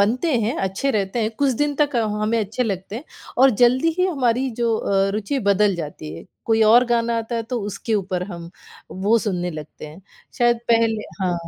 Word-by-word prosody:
बनते 250 +10 +1
हैं, 220 +3 -1
अच्छे 195 +8 -1
रहते 200 +1 -1
हैं। 220 - 0
कुछ 280 -2 +2
दिन 295 -1 0
तक 285 -4 +2
हमें 215 0 0
अच्छे 215 +5 -2
लगते 200 -1 -4
हैं, 275 - -8 0.3
और 265 +1 +7
जल्दी 255 +7 +4
ही 365 - +3
हमारी 260 -5 0
जो 230 -2 +2
अ, 195 -1 +1
रुचि 215 +6 -2
बदल 200 0 +3
जाती 145 - -6
है। - - -10 0.2
कोई 225 -1 +3
और 245 +2 +7
गाना 235 -1 0
आता 230 +1 -4
है, 230 - -1
तो 240 0 -4
उसके 215 +2 -3
ऊपर 185 -3 -1
हम 170 0 -8 0.4
वो 205 +5 +2
सुनने 180 -5 -2
लगते 155 -1 -9
हैं। 155 +4 -12 0.4
शायद 240 -1 +3
पहले 225 -2 +2 0.2
हाँ, 180 -2 +1
225 Hz, 200 wpm, -21 LUFS, 195-240 Hz, 0.4 s, और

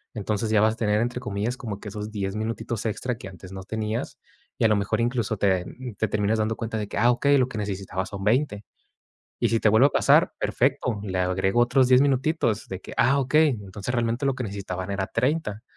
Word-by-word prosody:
Entonces, 110 +1 -2
ya 110 -1 +4
vas 110 0 +4
a - - -12
tener, 105 -2 +1
entre 120 +1 -2
comillas, 105 +2 -3
como 110 -6 -6
que 105 - -8
esos 105 +1 -6
10 100 -2 -3
minutitos 110 +1 -3
extra 120 +3 -2
que - - -8
antes 95 -1 -11
no 95 -1 -7
tenias. 110 +2 -3 0.4
Y - - -1
a - - +7
lo 105 - +3
mejor, 100 +2 0
incluso 115 -2 0
te, 95 -3 +1
mm, 125 +2 -8
te 110 - +1
terminas 105 +1 0
dando 110 +1 0
cuenta 115 -1 -4
de 105 - -3
que: - - -6
Ah, 120 +2 +5
okey 140 +4 +3
Lo 130 -2 +3
que 115 -4 -6
necesitaba 95 -2 -3
son 100 0 -7
20". 110 -1 +1 0.8
Y - - +3
si 115 -1 +1
te - - +4
vuelve 110 +6 +6
a - - -14
pasar, - - +4
perfecto, 125 -4 0
le 95 -3 -3
agrego 95 +4 +1
otros 125 +1 +4
10 130 +1 +6
minutitos, 135 -4 0
de 95 -1 -6
que: - - -10
"Ah, 140 +2 +4
okey. 150 +4 +4 0.2
Entonces, 100 +5 -5
realmente, 120 +2 0
lo 135 - +1
que 130 - -4
necesitaban 100 -2 -5
eran 95 -1 -2
30". 120 -4 0
110 Hz, 230 wpm, -25 LUFS, 100-125 Hz, 0.8 s, a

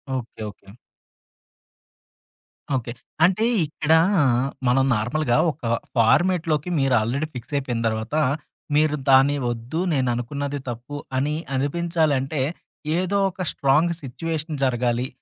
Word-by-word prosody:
Okay. 120 -3 -6
Okay. 100 -1 -17 2.1
Okay. 120 -2 -3 0.3
అంటే 190 +5 +2 0.2
ఇక్కడ, 150 +1 -3 0.8
మనం 130 +2 +4
నార్మల్‌గా, 120 +4 0
ఒక 150 - -18 0.4
ఫార్మాట్‌లోకి 160 +6 +2
మీరు 135 -1 +2
ఆల్రెడి 135 +8 -1
ఫిక్సయిపోయిన 125 -1 -3
తరువాత, 110 +5 -2 0.6
మీరు 150 0 +3
దాన్ని 135 +2 +6
వద్దు, 120 +8 -3
నేననుకున్నది 135 +2 -1
తప్పు. 125 +5 -6 0.2
అని 145 +3 0 0.2
అనిపించాలంటే, 150 -1 0 0.6
ఏదోక 190 0 0
స్ట్రాంగ్ 150 +5 +2
సిచ్యూ‌వేషన్ 155 +2 -4
జరగాలి. 120 0 0
140 Hz, 95 wpm, -23 LUFS, 125-155 Hz, 2.1 s, దాన్ని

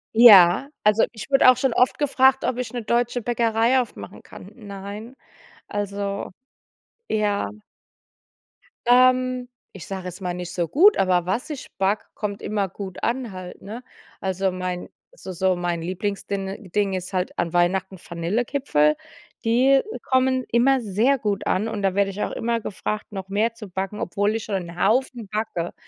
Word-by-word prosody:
Ja, 210 0 +8
also 210 +1 +4
ich 220 +1 -9
wurde 270 -2 +6
auch 255 - +5
schon 255 -1 +1
oft 250 +2 +2
gefragt, 265 -2 +3
ob 250 - -1
ich 250 -1 -4
'ne 245 - -3
deutsche 240 +2 0
Bäckerei 235 +2 +2
aufmachen 240 - -9
kann. 185 - -12
Nein, 205 +2 -9 0.5
also 200 -1 -3 0.8
Ja. 205 - 0 1.4
Ähm, 255 0 +4 0.2
ich 190 - -9
sage 190 -2 -6
jetzt 180 +2 -7
mal 180 -1 -2
nicht 180 0 -6
so 175 -2 -1
gut, 385 - +5
aber 180 -2 +2
was 200 - -2
ich 295 -4 -6
backe, 195 +2 0
kommt 205 -1 -4
immer 200 -2 -1
gut 190 0 -8
an 240 -1 -1
halt, 185 -1 -9
ne? 225 +5 -8 0.4
Also, 190 0 0
mein 180 -1 -4 0.2
so - - -9
so 185 +1 +1
mein 175 -1 -2
Lieblingsdinn 195 +2 -4
ding 200 -1 +1
ist 185 0 -4
halt 185 -1 -2
an 170 -1 -1
Weihnachten 185 +2 +1
Vanillekipferl. 170 - 0 0.5
Die 260 +4 +4 0.2
kommen 260 0 +2
immer 260 +3 +4
sehr 225 +6 +2
gut 205 -3 -2
an, 200 +4 +1
und 215 -2 -4
da 195 -1 0
werde 200 0 +2
ich 200 +2 -4
auch - - -3
immer 235 0 -1
gefragt, 215 +1 -4
noch 195 -2 -6
mehr 215 +4 +1
zu 230 -2 -10
backen, 190 +3 -4
obwohl 205 +4 0
ich 225 - -4
schon 205 - -3
'n 170 +1 -10
Haufen 245 -1 +1
backe. 210 -5 -3
205 Hz, 165 wpm, -23 LUFS, 190-240 Hz, 1.4 s, Ja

